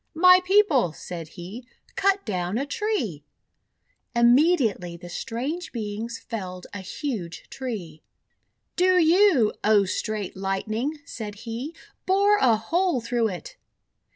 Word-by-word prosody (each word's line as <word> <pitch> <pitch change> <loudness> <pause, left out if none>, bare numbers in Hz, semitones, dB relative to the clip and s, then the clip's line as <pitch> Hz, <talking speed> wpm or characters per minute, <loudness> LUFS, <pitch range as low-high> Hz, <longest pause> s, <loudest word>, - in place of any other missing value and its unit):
"My 365 +2 +7
People," 365 - +3
said 170 -2 -7
he, 190 +8 -8 0.3
"cut 395 0 +2
down 185 -1 -2
a 275 - -1
tree!" 285 - -2 0.9
Immediately 235 - +3
the 175 0 -11
strange 270 - -4
Beings 225 +1 -4
felled 185 -5 -6
a 205 - -5
huge 190 - -5
tree. 200 - -6 0.7
:<Do 365 0 +4
you, 335 - +5
O 210 -2 +4
Straight 210 +1 -3
Lightning," 215 +9 -2
said 210 -6 -7
he, 245 +8 -5 0.3
'bore 400 +2 +4
a 235 -4 +5
hole 335 - 0
through 235 0 0
it!' 360 - -7
235 Hz, 120 wpm, -25 LUFS, -, 0.9 s, My